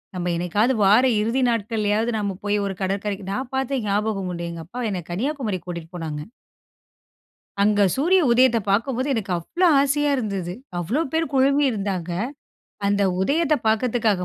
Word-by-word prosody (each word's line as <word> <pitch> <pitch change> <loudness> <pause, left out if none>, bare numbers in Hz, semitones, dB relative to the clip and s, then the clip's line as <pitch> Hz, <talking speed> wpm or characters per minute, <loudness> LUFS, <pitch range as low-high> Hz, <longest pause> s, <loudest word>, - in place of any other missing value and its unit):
நம்ம 175 0 -2
என்னைக்காவது 205 +9 +1
வார 210 +6 +6 0.2
இறுதி 235 +5 0
நாட்கள்லயாவது 220 0 0
நாம 200 -3 -2
போய் 205 0 +1
ஒரு 195 - -2
கடற்கரைக்கு 195 0 -2
நான் 255 +3 -4
பார்த்த 265 -1 -1
ஞாபகம் 200 -2 -1
உண்டு, 170 0 -4
எங்க 165 -1 -7
அப்பா 240 +9 -7
என்னை 185 -2 -3
கன்னியாகுமரிக்கு 220 - -3
கூட்டிட்டு 170 -2 -6
போனாங்க. 150 -2 -5 1.4
அங்க 205 0 +3
சூரிய 355 +7 +3
உதயத்த 245 0 +5
பார்க்கும்போது 255 +6 0
எனக்கு 200 -4 -3
அவ்வளோ 345 - +1
ஆசையா 290 +1 +1
இருந்தது. 195 -7 -3 0.3
அவ்ளோ 225 - 0
பேர் 320 -2 -1
குழுமி 275 +2 +3
இருந்தாங்க, 195 -5 -3 0.8
அந்த 200 0 +2 0.2
உதயத்த 305 - +2
பார்க்கிறதுக்காக 220 -4 +1
210 Hz, 145 wpm, -23 LUFS, 190-260 Hz, 1.4 s, வார